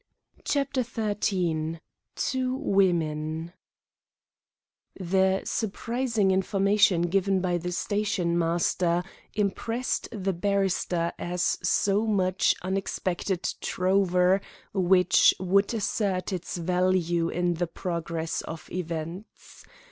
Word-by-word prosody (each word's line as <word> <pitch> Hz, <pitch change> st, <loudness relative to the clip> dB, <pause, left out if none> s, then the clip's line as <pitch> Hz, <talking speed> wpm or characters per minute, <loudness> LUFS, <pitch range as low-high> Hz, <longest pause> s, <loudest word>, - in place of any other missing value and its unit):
CHAPTER 275 Hz, -2 st, 0 dB
XIII 190 Hz, -8 st, -1 dB, 0.4 s
TWO 255 Hz, 0 st, -1 dB
WOMEN 165 Hz, -, 0 dB, 1.5 s
The 190 Hz, +1 st, +2 dB
surprising 230 Hz, -1 st, 0 dB
information 195 Hz, -1 st, +3 dB
given 195 Hz, +2 st, +1 dB
by 180 Hz, -1 st, 0 dB
the 180 Hz, +1 st, -4 dB
stationmaster 175 Hz, -3 st, 0 dB, 0.3 s
impressed 225 Hz, +4 st, -1 dB
the 195 Hz, -3 st, -2 dB
barrister 185 Hz, -2 st, 0 dB
as 175 Hz, 0 st, -1 dB
so 205 Hz, +2 st, +2 dB
much 185 Hz, -3 st, +2 dB
unexpected 190 Hz, -1 st, -2 dB
trover 185 Hz, 0 st, +2 dB, 0.3 s
which 185 Hz, -1 st, +4 dB
would 195 Hz, +2 st, +2 dB
assert 200 Hz, -4 st, -1 dB
its 180 Hz, 0 st, -4 dB
value 175 Hz, -1 st, +1 dB
in 175 Hz, 0 st, 0 dB
the 175 Hz, +1 st, -2 dB
progress 165 Hz, -2 st, -3 dB
of 160 Hz, 0 st, -8 dB
events. 170 Hz, +3 st, -6 dB
185 Hz, 85 wpm, -27 LUFS, 175-200 Hz, 1.5 s, which